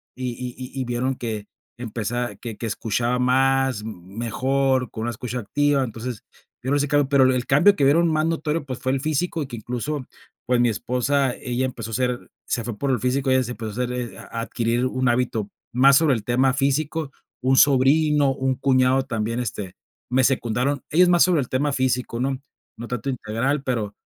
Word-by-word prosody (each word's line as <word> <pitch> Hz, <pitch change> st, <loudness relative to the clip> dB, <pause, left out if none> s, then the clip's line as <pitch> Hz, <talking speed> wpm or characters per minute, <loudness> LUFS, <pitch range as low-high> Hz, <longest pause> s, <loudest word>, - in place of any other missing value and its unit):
y 130 Hz, -1 st, -3 dB
y 125 Hz, +2 st, -7 dB
y 130 Hz, -, -2 dB
vieron 125 Hz, +2 st, -1 dB
que 110 Hz, -4 st, -5 dB, 0.3 s
empezaba 120 Hz, +1 st, -3 dB
que 115 Hz, -4 st, -8 dB
escuchaba 120 Hz, +2 st, -1 dB
más 130 Hz, -2 st, +2 dB
mejor, 120 Hz, +6 st, -1 dB
con 110 Hz, -, -6 dB
una 120 Hz, -, -1 dB
escucha 125 Hz, +2 st, -5 dB
activa. 140 Hz, +5 st, +1 dB
Entonces, 120 Hz, 0 st, -6 dB, 0.4 s
yo, 130 Hz, -, -2 dB
no 145 Hz, -, +3 dB
sé 145 Hz, -, +1 dB
que 145 Hz, -, 0 dB
hago, 140 Hz, -2 st, +2 dB
pero 140 Hz, -2 st, +5 dB
el 125 Hz, -1 st, -1 dB
cambio 175 Hz, +9 st, +5 dB
que 145 Hz, -, 0 dB
vieron 165 Hz, +5 st, +4 dB
más 155 Hz, 0 st, +1 dB
notorio, 160 Hz, -1 st, -1 dB
pues, 130 Hz, -3 st, -5 dB
fue 130 Hz, -, -1 dB
el 135 Hz, -, -1 dB
físico, 155 Hz, +2 st, -1 dB
y 135 Hz, -, -7 dB
que, 120 Hz, -, -7 dB
incluso, 125 Hz, +5 st, -4 dB, 0.4 s
pues, 125 Hz, 0 st, +2 dB
mi 120 Hz, -, +4 dB
esposa, 125 Hz, +4 st, 0 dB
ella 125 Hz, +1 st, -2 dB
empezó 115 Hz, -4 st, -5 dB
a -, -, -2 dB
ser 125 Hz, -1 st, -1 dB, 0.2 s
se 115 Hz, -, -1 dB
fue 115 Hz, -2 st, -5 dB
por 140 Hz, +5 st, -1 dB
el 125 Hz, -, +1 dB
físico, 130 Hz, +2 st, 0 dB
ella 130 Hz, 0 st, +4 dB
se 120 Hz, -, -5 dB
empezó 115 Hz, -2 st, -5 dB
a 125 Hz, -, +1 dB
hacer 125 Hz, -1 st, -5 dB
a -, -, -10 dB
a 115 Hz, -, -4 dB
adquirir 120 Hz, +1 st, -1 dB
un 130 Hz, -1 st, 0 dB
hábito 120 Hz, -4 st, 0 dB, 0.2 s
más 135 Hz, +2 st, +6 dB
sobre 160 Hz, -4 st, +4 dB
el 110 Hz, -, -4 dB
tema 130 Hz, +2 st, +2 dB
físico, 140 Hz, +2 st, 0 dB, 0.3 s
un 130 Hz, +1 st, +2 dB
sobrino, 145 Hz, +1 st, +4 dB
un 130 Hz, 0 st, -1 dB
cuñado 130 Hz, 0 st, +3 dB
también, 115 Hz, -2 st, -2 dB
este, 100 Hz, -5 st, -5 dB, 0.4 s
me 130 Hz, +1 st, +3 dB
secundaron, 130 Hz, +2 st, +1 dB
ellos 180 Hz, +3 st, +5 dB
más 175 Hz, -1 st, +6 dB
sobre 175 Hz, -5 st, +3 dB
el 125 Hz, -, -5 dB
tema 140 Hz, +2 st, 0 dB
físico, 125 Hz, -2 st, -1 dB
¿no? 135 Hz, 0 st, -1 dB, 0.4 s
No 120 Hz, +1 st, -7 dB
tanto 125 Hz, +2 st, -3 dB
integral, 130 Hz, +3 st, -1 dB
pero, 120 Hz, -6 st, -1 dB
o 105 Hz, -, -18 dB
130 Hz, 200 wpm, -23 LUFS, 120-140 Hz, 0.4 s, más